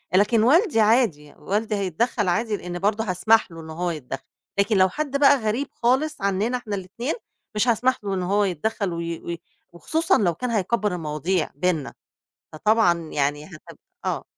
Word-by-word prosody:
لكن 210 Hz, +3 st, +4 dB
والدي 310 Hz, -, +4 dB
عادي، 210 Hz, -, +2 dB
والدي 210 Hz, +2 st, -1 dB
هيتدخّل 200 Hz, +3 st, -1 dB
عادي 210 Hz, +4 st, 0 dB
لإن 175 Hz, 0 st, -6 dB
برضه 205 Hz, +3 st, +1 dB
هاسمح 215 Hz, +2 st, +2 dB
له 165 Hz, 0 st, -9 dB
إنه 160 Hz, 0 st, -9 dB
هو 175 Hz, +1 st, -1 dB
يتدخّل، 135 Hz, -4 st, -6 dB, 0.4 s
لكن 200 Hz, +1 st, +3 dB
لو 185 Hz, 0 st, +5 dB
حد 285 Hz, +5 st, -2 dB
بقى 280 Hz, -1 st, +6 dB
غريب 230 Hz, +4 st, -1 dB
خالص 265 Hz, +3 st, 0 dB
عننا 200 Hz, +6 st, 0 dB
إحنا 215 Hz, -4 st, -5 dB
الاتنين، 205 Hz, -, -4 dB, 0.4 s
مش 210 Hz, +3 st, +1 dB
هاسمح 250 Hz, +2 st, +2 dB
له 200 Hz, -1 st, -2 dB
إنه 185 Hz, 0 st, -2 dB
هو 205 Hz, +1 st, +3 dB
يتدخّل 195 Hz, +1 st, -1 dB
وي 170 Hz, 0 st, -4 dB
وي 170 Hz, -1 st, -6 dB, 0.3 s
وخصوصًا 320 Hz, -, +1 dB
لو 175 Hz, -5 st, +2 dB
كان 250 Hz, +8 st, -4 dB
هيكبّر 210 Hz, -2 st, 0 dB
المواضيع 160 Hz, +2 st, -1 dB
بيننا، 160 Hz, -2 st, -1 dB, 0.6 s
فطبعًا 195 Hz, +1 st, +3 dB
يعني 145 Hz, +1 st, -1 dB
هت 165 Hz, -5 st, -13 dB, 0.3 s
آه. -, -, -2 dB
200 Hz, 165 wpm, -24 LUFS, 170-230 Hz, 0.6 s, بقى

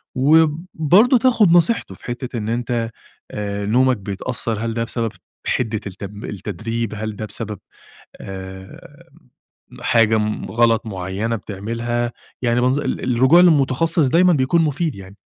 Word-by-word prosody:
وبرضه 160 Hz, -, +4 dB
تاخد 230 Hz, -6 st, +4 dB
نصيحته 175 Hz, +7 st, +2 dB
في -, -, -17 dB
حتّة 120 Hz, 0 st, -5 dB
إن 110 Hz, 0 st, -3 dB
أنت 120 Hz, -1 st, -1 dB, 0.4 s
آآ 100 Hz, -1 st, -4 dB
نومك 125 Hz, +3 st, +3 dB
بيتأثّر، 105 Hz, +3 st, -4 dB
هل 115 Hz, -, -2 dB
ده 115 Hz, 0 st, -1 dB
بسبب 115 Hz, -1 st, -3 dB, 0.4 s
حدة 110 Hz, -4 st, 0 dB
التب 100 Hz, +2 st, -8 dB
التدريب، 110 Hz, +3 st, -4 dB
هل 110 Hz, 0 st, -4 dB
ده 110 Hz, -, -5 dB
بسبب 105 Hz, -1 st, -6 dB, 0.6 s
آآ 95 Hz, 0 st, -10 dB, 0.7 s
حاجة 110 Hz, -1 st, +3 dB
م 105 Hz, 0 st, -2 dB
غلط 115 Hz, -1 st, +2 dB
معينة 100 Hz, +3 st, -3 dB
بتعملها، 115 Hz, +4 st, -3 dB, 0.3 s
يعني 120 Hz, 0 st, +2 dB
منظ 130 Hz, +3 st, +2 dB
ال 125 Hz, -3 st, -2 dB
الرجوع 130 Hz, +8 st, +6 dB
للمتخصّص 160 Hz, -2 st, +3 dB
دايمًا 180 Hz, +4 st, +4 dB
بيكون 150 Hz, +4 st, +2 dB
مفيد 155 Hz, 0 st, -1 dB
يعني. 95 Hz, +1 st, -12 dB
115 Hz, 135 wpm, -20 LUFS, 105-140 Hz, 0.7 s, الرجوع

